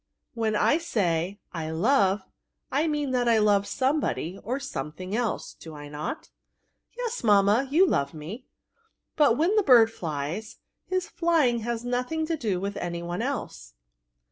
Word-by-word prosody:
When 225 -3 0
I 300 +8 +3
say 190 - -1 0.2
I 160 -2 -4
love, 195 +2 +2 0.5
I 295 +5 +1
mean 295 -3 -1
that 245 -2 +2
I 230 - +5
love 205 -2 +3
some 275 +3 +1
body 185 - -3
or 255 +5 -2
something 185 - -5
else; 235 -2 -2
do 160 -1 -11
I 145 0 -9
not?" 150 - -5 0.3
'* - - -42
Yes, 480 - -3
mamma, 210 +4 +4
you 335 +7 +5
love 140 - 0
me. 185 +12 -8
'^ - - -52 0.6
But 285 -7 +4
when 345 +7 +2
the 425 - +5
bird 240 - +6
flies, 165 +4 -4 0.3
his 370 -1 -1
flying 320 -9 +2
has 235 +1 -3
nothing 250 +6 -1
to 330 +1 -1
do 215 - -1
with 200 +2 -4
any 170 -1 -4
one 175 +4 -3
else." 130 - -5
225 Hz, 170 wpm, -26 LUFS, 180-280 Hz, 0.6 s, bird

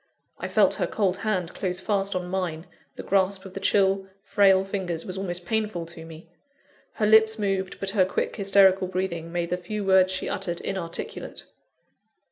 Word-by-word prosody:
I - - -4
felt - - +3
her - - +1
cold 195 -4 0
hand 185 -6 -2
close 180 -1 -2
fast 200 0 -1
on 180 -1 -2
mine; 180 -3 -3 0.3
the - - -7
grasp 195 0 +1
of 190 - -10
the 195 - -5
chill, 195 -1 +2 0.2
frail 195 -2 +4
fingers 185 -4 -3
was 185 - -5
almost 180 -2 -4
painful 210 -4 -1
to 165 -1 -10
me. 165 +1 -12 0.7
Her 215 - 0
lips 220 +1 +5
moved, 195 -3 -2
but 195 -1 -1
her 195 -2 +4
quick, 185 - -2
hysterical 195 -2 +4
breathing 175 -3 -3
made 175 0 -2
the 180 - +1
few 200 +3 -5
words 190 -1 +5
she 185 - -2
uttered 185 -4 -3
inarticulate. 180 -4 -5
190 Hz, 175 wpm, -25 LUFS, 180-200 Hz, 0.7 s, lips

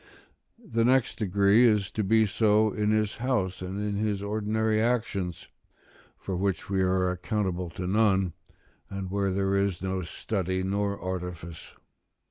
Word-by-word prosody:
The 195 - -1
next 125 0 +2
degree 100 +2 +4
is 105 -4 +1
to 110 - -1
be 110 +3 +4
so 110 +1 +3
in 105 -1 0
his 110 -1 +1
house, 115 -8 -1
and 95 +2 -4
in 105 -1 -2
his 105 -2 -1
ordinary 110 +1 0
actions, 110 -7 -1 0.7
for 95 - -5
which 95 0 -2
we 95 -1 +2
are 90 0 +2
accountable 90 -1 -2
to 90 +2 -6
none, 95 -2 +2 0.6
and 95 -2 -5
where 100 0 0
there 95 +1 0
is 100 -2 0
no 95 0 -1
study 95 +1 -3
nor 100 +1 -1
artifice. 90 -2 -6
100 Hz, 145 wpm, -27 LUFS, 95-110 Hz, 0.7 s, degree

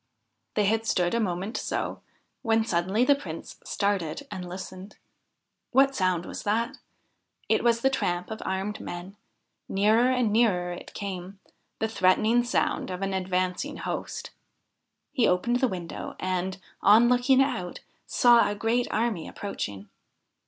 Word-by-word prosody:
They 210 - +3
had 225 +2 +1
stood 175 -1 +1
a 235 - +2
moment 195 +2 -2
so, - - -3 0.4
when 225 -2 +2
suddenly 190 +5 +1
the 285 - +6
Prince 175 - -7
started 200 - -1
and 180 -3 -5
listened. 185 +2 -8 0.8
What 270 +2 +5
sound 185 -5 +1
was - - -6
that? 230 +6 -1 0.7
It - - +2
was 235 -1 +3
the 270 - +4
tramp 175 -6 -1
of 220 - -5
armed 190 +2 -2
men; 175 +3 -7 0.5
nearer 215 +5 +4
and 245 -5 +1
nearer 190 -6 +2
it 175 - -10
came 195 -1 -6 0.4
the 220 - 0
threatening 220 +3 +3
sound 240 - 0
of 185 +1 -4
an 195 0 -1
advancing 185 +8 -1
host. - - -5 0.8
He 255 -6 +3
opened 235 +7 +2
the 260 +1 +2
window, 180 -6 -6
and, 185 0 -2 0.2
on 220 +4 +7
looking 250 +2 +4
out, 180 -10 0 0.3
saw 240 -3 +5
a 205 - -2
great 225 +4 +1
army 220 -7 0
approaching. 100 - -5
205 Hz, 145 wpm, -27 LUFS, 185-235 Hz, 0.8 s, on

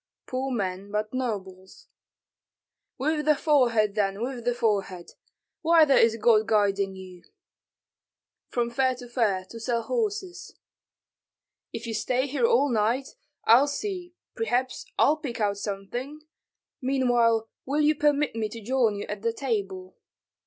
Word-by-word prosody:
"Poor 260 +1 -3
men, 195 -4 -3
but 210 +2 -2
nobles." 190 -7 -5 1.1
"With 300 +2 -1
the 305 0 +4
forehead, 240 -9 +2
then, 200 -1 0
with 245 -2 -5
the 245 0 +1
forehead. 200 -6 -1 0.5
Whither 320 -4 +5
is 225 -3 +5
God 220 -1 +4
guiding 200 -3 +1
you?" 185 -2 -11 1.3
"From 235 -1 -1
fair 260 +1 +1
to 245 0 -10
fair, 215 -6 0
to 230 - -8
sell 235 0 -1
horses." 415 - -3 1.1
"If 230 - -6
you 230 - -4
stay 250 +5 0
here 290 - +1
all 465 - +3
night, 240 +4 0 0.3
I'll 245 +6 +6
see, 355 +2 -4 0.2
perhaps 245 - -1
I'll 305 - +4
pick 250 -6 -6
out 205 -2 0
something. 240 +9 -5 0.6
Meanwhile 240 -4 +2 0.2
will 290 +3 +1
you 300 +1 +4
permit 295 -2 +1
me 220 -2 -2
to 230 - -8
join 230 -1 +1
you 205 - -5
at 205 -1 -5
the 230 +1 0
table?" 195 -8 -4
235 Hz, 140 wpm, -26 LUFS, 210-275 Hz, 1.3 s, I'll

